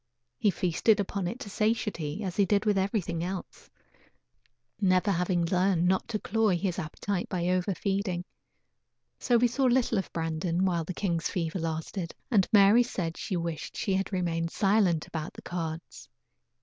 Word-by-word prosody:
He 210 - +3
feasted 190 +4 +2
upon 200 -2 -2
it 235 +8 -5
to 205 - -6
satiety 210 -6 -1
as 185 -2 -3
he 205 - +4
did 200 +2 +1
with 210 -1 +3
everything 190 -4 -1
else; 185 +1 -6 1.1
never 185 0 +3
having 175 -1 +1
learned 180 0 +2
not 185 +1 +1
to 225 - -1
cloy 215 -3 +1
his 180 -1 -2
appetite 180 +4 -3
by 175 -1 -1
over 185 +1 +1
feeding. 195 -3 -1 0.9
So 240 - +3
we 245 +1 +4
saw 255 +3 0
little 245 -3 +3
of 190 - -5
Brandon 165 +2 -1
while 170 -3 0
the 185 - -5
king's 170 -4 -1
fever 170 0 -2
lasted, 165 +2 -4 0.2
and 200 -5 +4
Mary 205 +3 +7
said 180 -9 -2
she 185 - -3
wished 170 -2 -4
she 195 - 0
had 195 +2 -1
remained 170 -3 -1
silent 195 -4 +2
about 160 0 -5
the - - -12
cards. 165 -2 -6
185 Hz, 165 wpm, -28 LUFS, 170-205 Hz, 1.1 s, Mary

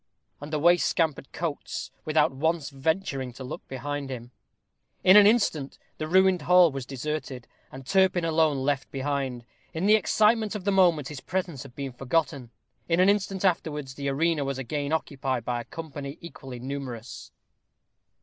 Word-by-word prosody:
And 145 +1 -8
away 170 +3 +4
scampered 160 -5 0
Coates, 160 -2 -4
without 155 0 +3
once 150 +2 -1
venturing 135 -2 -1
to 130 - -9
look 130 - -8
behind 140 +1 -4
him. 120 -2 -7 0.7
In 185 - +7
an 205 -1 +9
instant 185 - +1 0.2
the 155 - -3
ruined 190 0 +4
hall 180 +1 +6
was 135 -2 -6
deserted, 135 -2 -5 0.2
and 130 0 -10
Turpin 185 +2 +3
alone 160 -3 +2
left 135 0 -1
behind. 135 -3 -3 0.3
In 165 +4 -1
the 210 - +6
excitement 215 +2 +3
of 205 - -5
the 200 - +1
moment 175 -7 +3
his 145 -4 -7
presence 180 -7 -3
had 135 -3 -12
been 140 -2 -5
forgotten. 135 -1 -1 0.4
In 165 +1 +2
an 185 +2 +6
instant 195 -1 0
afterwards 150 -6 -1
the 140 0 -3
arena 155 +2 +1
was 135 -1 -3
again 140 +3 -3
occupied 135 -6 -2
by 120 -1 -1
a - - -11
company 145 -2 -7
equally 135 -7 -9
numerous. 125 -3 -7
145 Hz, 160 wpm, -26 LUFS, 135-170 Hz, 0.7 s, an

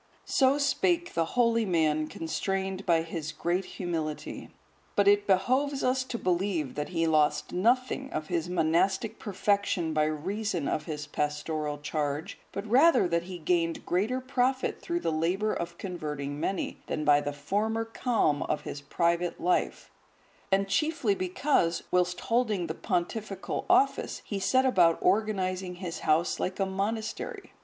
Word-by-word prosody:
So 270 +1 +3
spake 340 +4 +1
the 165 - +1
holy 230 -1 +4
man 155 -5 +1
constrained 190 +4 -3
by 165 -2 +4
his 165 -2 -5
great 175 +3 -1
humility. 160 -5 -4 0.5
But 200 -1 +3
it 205 0 +4
behoves 260 +9 +2
us 255 +1 +2
to 250 - -4
believe 180 - 0
that 150 0 -4
he 165 -2 0
lost 155 -2 +2
nothing 255 +7 +1
of 155 0 -3
his 170 +1 -2
monastic 180 +5 +1
perfection 200 -5 0
by 155 0 +3
reason 175 +2 -2
of 150 - -1
his 150 -2 -5
pastoral 150 0 -2
charge, 145 0 -3
but 200 - -5
rather 265 - +5
that 170 0 0
he 180 -1 -6
gained 165 0 0
greater 210 +9 0
profit 260 0 0
through 345 -1 -2
the - - 0
labour 180 +7 0
of 170 0 -5
converting 150 -6 -4
many, 190 +4 -2
than 155 - -2
by 145 -1 +5
the 145 - -3
former 210 +10 -1
calm 225 - +1
of 150 - -1
his 140 - -6
private 170 +4 0
life, 180 +1 0 0.6
and 195 +1 +3
chiefly 280 +1 +1
because, 185 - +1
whilst 180 0 +1
holding 225 -6 +1
the 160 - -3
pontifical 190 +4 -3
office, 375 +3 +2
he 200 - -3
set 260 +6 +3
about 175 -10 +4
organizing 185 -2 0
his 175 -2 -5
house 160 +3 +1
like 185 +2 -2
a 195 - +2
monastery. 220 - -3
185 Hz, 150 wpm, -28 LUFS, 160-220 Hz, 0.6 s, rather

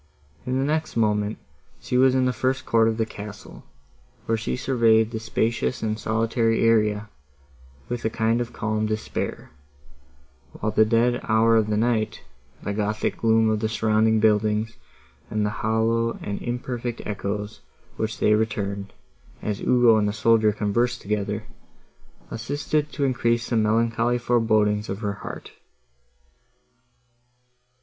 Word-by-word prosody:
In 130 +1 0
the 135 - +1
next 155 -2 -1
moment, 105 -1 +1 0.4
she - - -4
was 130 +1 +5
in 130 -1 +3
the 125 - +1
first 130 +1 -1
court 115 -1 +3
of 110 -1 0
the 110 - +1
castle, 105 -1 -10 0.6
where 115 - +1
she 110 0 -2
surveyed 115 -4 +3
the 110 - -3
spacious 115 +2 -1
and 110 0 -1
solitary 115 +1 +1
area, 105 -2 +2 0.8
with 120 -1 -4
a 110 - +1
kind 115 +2 +1
of 120 - -4
calm 110 0 -1
despair; 110 0 -4 1.0
while 110 - -2
the 110 +1 +4
dead 120 +2 +2
hour 115 +1 +4
of 110 -1 +3
the 105 - +1
night, 110 -1 0 0.4
the 105 - -2
gothic 105 +1 -1
gloom 115 -1 +3
of 110 - 0
the 110 0 -1
surrounding 110 0 +2
buildings, 110 +1 +1 0.5
and 110 -2 0
the 105 - -1
hollow 115 +1 +1
and 100 - -4
imperfect 120 -1 -4
echoes, 105 -2 -4 0.4
which 110 0 -2
they 105 - +3
returned, 100 -2 -2 0.5
as 105 -2 -2
Ugo 120 -3 +5
and 105 -1 +2
the 105 - -1
soldier 110 0 +3
conversed 120 +4 -1
together, 105 +1 -2 0.9
assisted 145 +5 -2
to 145 - -3
increase 120 -2 0
the - - +2
melancholy 115 +2 +2
forebodings 110 -3 +1
of 95 +3 -4
her 100 -2 -1
heart. - - -8
110 Hz, 140 wpm, -24 LUFS, 105-120 Hz, 1.0 s, was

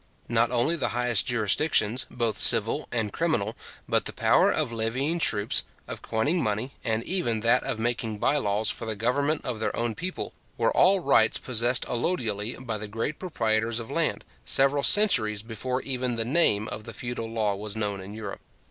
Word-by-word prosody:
Not 115 0 +2
only 125 +7 +1
the 135 -7 -2
highest 120 -3 +2
jurisdictions, 120 +1 +1
both 115 -3 -2
civil - - +5
and 110 -4 -2
criminal, 120 -11 -1 0.3
but - - +1
the - - -2
power - - +3
of - - -1
levying 125 +9 -2
troops, 105 -8 +1 0.3
of - - -7
coining 145 +10 -1
money, 110 +5 -2
and 110 -1 -1
even 120 - 0
that 115 +3 +3
of - - -4
making 115 -1 -2
bye 145 - +1
laws 105 -4 +1
for 115 - -6
the 110 - -2
government 140 +8 0
of 120 -4 -3
their 110 - -2
own 120 -1 -2
people, 180 - -5 0.2
were 115 -1 0
all 190 +1 +4
rights 125 -7 +3
possessed 120 0 +1
allodially 115 - -2
by 110 -3 -3
the 110 - -5
great 115 +8 -4
proprietors 115 - -1
of 115 - -8
land, - - -1 0.2
several 140 +1 +2
centuries 120 - +5
before 125 +3 -4
even 125 -2 -1
the 115 -1 -1
name 115 -7 +2
of 105 - -6
the 115 - -8
feudal 120 +1 -5
law 110 -3 -1
was 100 +1 -4
known 105 -3 -3
in 100 +3 -10
Europe. 105 -3 -7
115 Hz, 185 wpm, -26 LUFS, 110-130 Hz, 0.3 s, civil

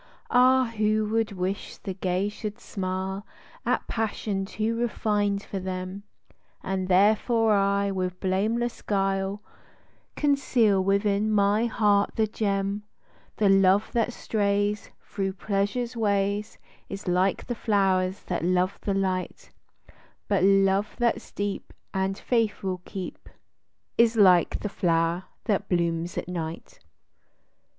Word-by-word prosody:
Ah, 255 -1 +4
who 215 0 +2
would 225 0 0
wish 190 +2 -3
the 195 - -5
gay 185 +1 -1
should 210 0 -6
smile 190 +1 -4 0.4
At - - +1
passion 210 -3 -2
too 220 +3 -2
refined 210 -3 0
for 195 - -5
them: 185 +1 -5 0.3
— - - -39
And 190 -1 -2
therefore 215 +4 +3
I 200 0 +2
with 185 -1 -3
blameless 220 +6 -1
guile 195 0 -1 0.7
Conceal 245 -9 +2
within 200 +2 +1
my 210 +2 +3
heart 205 -3 +2
the 220 - +2
gem: 200 -1 -1 0.3
— - - -33
The 210 - +3
love 195 +1 +4
that 235 0 +1
strays 205 -2 -1
Thro' 195 -2 -3
pleasure's 205 +5 -2
ways, 205 -1 0 0.3
Is 195 0 -7
like 185 +2 +1
the 245 - -2
flow'rs 195 -4 +1
that 175 - -3
love 185 +2 +1
the 200 - -1
light; 185 -2 -2 0.8
But 200 -3 +2
love 195 +1 +3
that's 235 -1 0
deep, 205 -1 -4 0.2
And 190 0 -1
faith 225 -4 0
will 185 -2 -2
keep, 190 -3 -7 0.7
Is 235 0 +5
like 185 -6 +5
the - - -2
flow'r 170 -2 0 0.2
that 205 -1 0
blooms 170 -1 0
at - - -3
night. 165 -2 -6
200 Hz, 125 wpm, -26 LUFS, 190-215 Hz, 0.8 s, Is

